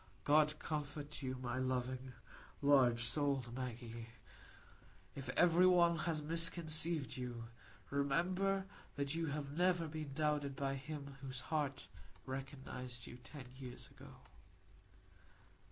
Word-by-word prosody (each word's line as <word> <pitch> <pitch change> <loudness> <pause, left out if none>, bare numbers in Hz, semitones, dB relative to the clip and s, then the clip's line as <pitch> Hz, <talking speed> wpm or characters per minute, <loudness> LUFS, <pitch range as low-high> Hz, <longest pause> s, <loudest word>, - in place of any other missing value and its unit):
"God 150 +1 +5
comfort 150 -1 -4
you, 130 -1 -2
my 120 +1 -1
loving, 130 0 -1 0.5
large 130 -5 +6
souled 135 -2 0
Maggie. 120 -2 -5 1.1
If 135 -2 -6
every 175 +1 +7
one 175 -2 +6
else 160 -2 -1
has 160 -3 0
misconceived 165 -2 +1
you, 120 -2 -4 0.5
remember 180 +8 +2 0.3
that 140 0 0
you 165 0 0
have 145 -1 -3
never 175 -1 +3
been 155 -2 -5
doubted 150 -2 +1
by 135 0 0
him 140 0 -6
whose 130 -2 -3
heart 145 -3 0 0.4
recognised 130 -2 -5
you 120 - -9
ten 130 +3 -10
years 130 0 -7
ago. 135 0 -12
140 Hz, 120 wpm, -38 LUFS, 130-155 Hz, 1.1 s, every